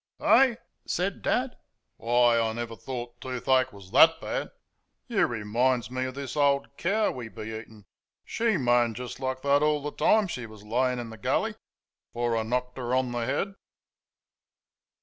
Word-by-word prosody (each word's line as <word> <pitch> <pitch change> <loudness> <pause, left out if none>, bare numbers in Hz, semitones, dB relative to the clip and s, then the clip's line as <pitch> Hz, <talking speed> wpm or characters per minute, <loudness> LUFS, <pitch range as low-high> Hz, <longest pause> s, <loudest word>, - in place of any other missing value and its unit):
"Eh!" 260 -3 +5 0.3
said 185 +3 -1
Dad, 250 0 0 0.4
"why, 120 0 +3
I 110 -1 0
never 115 0 -5
thought 120 0 -7
toothache 130 0 +1
was 100 -2 -14
THET 165 0 +6
bad! - - -3 0.6
You 235 -5 +2
reminds 120 +1 0
me 130 0 -2
of 130 0 -5
this 140 -1 -5
old 140 -1 +1
cow 210 +7 +1
we 120 -3 -7
be - - -9
eatin'. 110 -2 -11 0.4
SHE 225 -4 0
moaned 120 -4 +2
just 125 +2 -7
like 130 -1 -3
thet 140 0 +3
all 150 0 +2
the 150 - -3
time 215 +6 +3
she 125 -9 -5
was 110 -2 -13
layin' 125 +4 0
in 120 -2 -6
the 110 - -10
gully, - - 0 0.6
afore 120 -1 0
I 115 - +1
knocked 125 +3 -2
'er 125 0 -1
on 130 -1 +1
the 120 -1 -2
head." 170 +9 -1
125 Hz, 170 wpm, -27 LUFS, 120-140 Hz, 0.6 s, THET